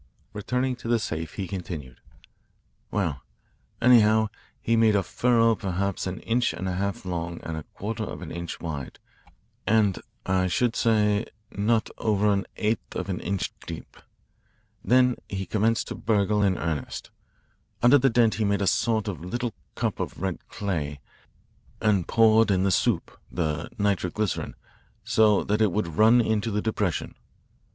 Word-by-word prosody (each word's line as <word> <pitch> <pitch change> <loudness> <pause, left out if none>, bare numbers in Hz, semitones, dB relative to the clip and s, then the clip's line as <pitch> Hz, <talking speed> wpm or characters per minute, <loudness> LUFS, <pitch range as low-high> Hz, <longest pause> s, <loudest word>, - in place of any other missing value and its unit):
Returning 125 +5 -1
to 115 - -8
the 120 0 +3
safe, 80 -7 -4
he 95 -3 -3
continued: 85 -9 -6 0.9
"Well, 85 -10 -1 0.6
anyhow, 110 -3 +5 0.3
he 115 - +1
made 110 -2 +4
a 100 - +2
furrow 115 +3 +3
perhaps 100 -2 -2
an 95 - -5
inch 120 +1 +1
and 95 - -4
a - - -1
half 100 +1 -2
long 85 -1 -3
and 80 - -4
a 80 - -4
quarter 110 +2 -3
of - - -7
an 80 - -7
inch 85 0 -5
wide 75 -6 -5 0.7
and, 105 -2 +3 0.2
I 95 0 +2
should 115 +7 +1
say, 105 -1 +2 0.2
not 110 +2 +1
over 105 -1 +2
an 100 -1 -1
eighth 110 +1 -1
of - - -3
an 90 - -2
inch 100 -2 -2
deep. - - -8 0.9
Then 125 0 +4
he 95 -1 -3
commenced 110 +4 +1
to - - -3
burgle 105 -1 +1
in 95 -3 +2
earnest. 80 -4 -4 0.7
Under 130 +4 +7
the 135 +1 +4
dent 115 -2 +3
he 110 - -1
made 100 0 +1
a - - +1
sort 110 +2 +1
of 90 -5 -4
little 120 +4 -3 0.2
cup - - -2
of - - -4
red 95 -2 -4
clay 75 -8 -3 0.8
and 100 -5 +2
poured 110 -1 +5
in 95 -2 +2
the 100 - +2
'soup' - - 0
the 80 -2 -2
nitroglycerin 100 -1 -1 0.5
so 105 -2 +4
that 105 +2 0
it 105 -3 +4
would 95 -3 -1
run 115 +3 +6
into 110 0 0
the 105 -1 0
depression. 105 -6 -1
105 Hz, 160 wpm, -26 LUFS, 90-110 Hz, 0.9 s, Under